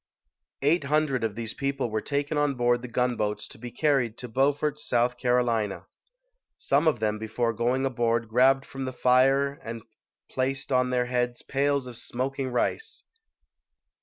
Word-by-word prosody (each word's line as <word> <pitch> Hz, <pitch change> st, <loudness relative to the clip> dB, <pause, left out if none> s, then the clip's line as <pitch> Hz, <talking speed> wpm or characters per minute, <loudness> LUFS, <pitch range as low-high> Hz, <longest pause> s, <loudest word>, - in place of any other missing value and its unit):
Eight 150 Hz, +1 st, +3 dB
hundred 145 Hz, -4 st, +1 dB
of 110 Hz, -2 st, -1 dB
these 115 Hz, -1 st, -4 dB
people 135 Hz, -3 st, -2 dB
were 110 Hz, 0 st, -1 dB
taken 145 Hz, +1 st, -2 dB
on 145 Hz, -2 st, +1 dB
board 120 Hz, 0 st, +2 dB
the 125 Hz, -, -6 dB
gunboats 120 Hz, -4 st, -1 dB
to -, -, -13 dB
be 120 Hz, +1 st, -7 dB
carried 130 Hz, -5 st, +1 dB
to 125 Hz, -, -7 dB
Beaufort, 145 Hz, +4 st, +1 dB
S. 120 Hz, -3 st, +1 dB
C. 120 Hz, -3 st, +1 dB, 0.9 s
Some -, -, +1 dB
of 145 Hz, -7 st, +2 dB
them 105 Hz, -1 st, -1 dB
be 110 Hz, -, -5 dB
fore 115 Hz, +1 st, 0 dB
going 125 Hz, +4 st, 0 dB
aboard 115 Hz, -3 st, 0 dB
grabbed 130 Hz, +4 st, +4 dB
from 135 Hz, 0 st, -6 dB
the 130 Hz, -, -4 dB
fire 135 Hz, +3 st, +3 dB
and 115 Hz, -1 st, -6 dB, 0.4 s
placed 135 Hz, +1 st, -2 dB
on 125 Hz, -1 st, +3 dB
their 125 Hz, -1 st, +1 dB
heads 125 Hz, -1 st, -1 dB
pails 140 Hz, 0 st, 0 dB
of 125 Hz, -2 st, -7 dB
smoking 130 Hz, +3 st, -3 dB
rice. 435 Hz, -, -2 dB
125 Hz, 165 wpm, -27 LUFS, 120-140 Hz, 0.9 s, grabbed